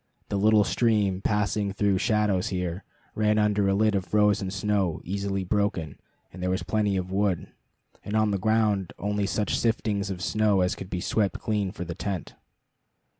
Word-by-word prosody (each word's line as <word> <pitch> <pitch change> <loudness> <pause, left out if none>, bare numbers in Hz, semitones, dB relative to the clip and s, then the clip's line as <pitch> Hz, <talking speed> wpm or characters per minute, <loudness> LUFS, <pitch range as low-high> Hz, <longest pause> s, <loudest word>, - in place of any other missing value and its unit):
The - - -2
little 105 +1 +5
stream, 105 -5 +1
passing 105 0 0
through 100 -2 +1
shadows 105 -5 +1
here, 90 0 -3 0.3
ran 105 0 +2
under 105 -1 +2
a 95 - +2
lid 110 +1 +3
of 95 -2 0
frozen 105 -1 +2
snow 100 -3 0
easily 100 +1 -2
broken, 95 -6 -1 0.3
and 95 - -9
there 90 - 0
was 95 +1 -1
plenty 105 -3 0
of 90 0 -3
wood, 95 -2 0 0.5
and 105 - -4
on 110 -1 +3
the 100 - 0
ground 105 -2 +1
only 105 0 -1
such 105 +1 0
siftings 105 -3 0
of 90 -2 -5
snow 105 -1 +2
as 90 - +1
could 95 - -8
be 90 - -3
swept 100 -3 0
clean 105 -3 -1
for 90 -3 -6
the 85 - -5
tent. 95 -1 -4
100 Hz, 175 wpm, -26 LUFS, 95-105 Hz, 0.5 s, little